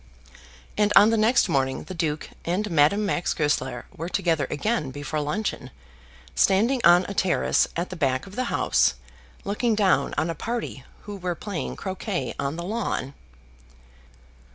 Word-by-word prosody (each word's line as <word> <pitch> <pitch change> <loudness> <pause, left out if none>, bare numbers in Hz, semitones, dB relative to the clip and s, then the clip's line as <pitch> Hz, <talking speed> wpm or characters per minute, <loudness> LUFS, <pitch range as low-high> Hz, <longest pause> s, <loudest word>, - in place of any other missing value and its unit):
And 210 0 +3
on 210 +3 +8
the - - +3
next 225 +4 +3
morning 130 -1 0
the 175 - -8
Duke 155 -3 -3
and 195 +4 -1
Madame 165 +7 +3
Max 180 -3 -1
Goesler 135 -5 -1
were 165 +3 -5
together 165 -7 0
again 180 - -1
before 145 +3 -4
luncheon, 150 -3 -3 0.6
standing 230 +7 +3
on 175 +2 +6
a 200 - -4
terrace 185 -2 +2
at 175 +2 -3
the - - -5
back 135 -5 0
of 195 0 -12
the 255 - -1
house, - - +2 0.5
looking 215 +3 0
down 190 -10 +2
on 160 +2 0
a - - -3
party 225 - -4 0.2
who 205 -1 -7
were 180 -2 -3
playing 200 -2 -5
croquet 190 - -4
on 140 +2 -2
the 170 - -5
lawn. 190 - -3
175 Hz, 155 wpm, -25 LUFS, 150-210 Hz, 0.6 s, on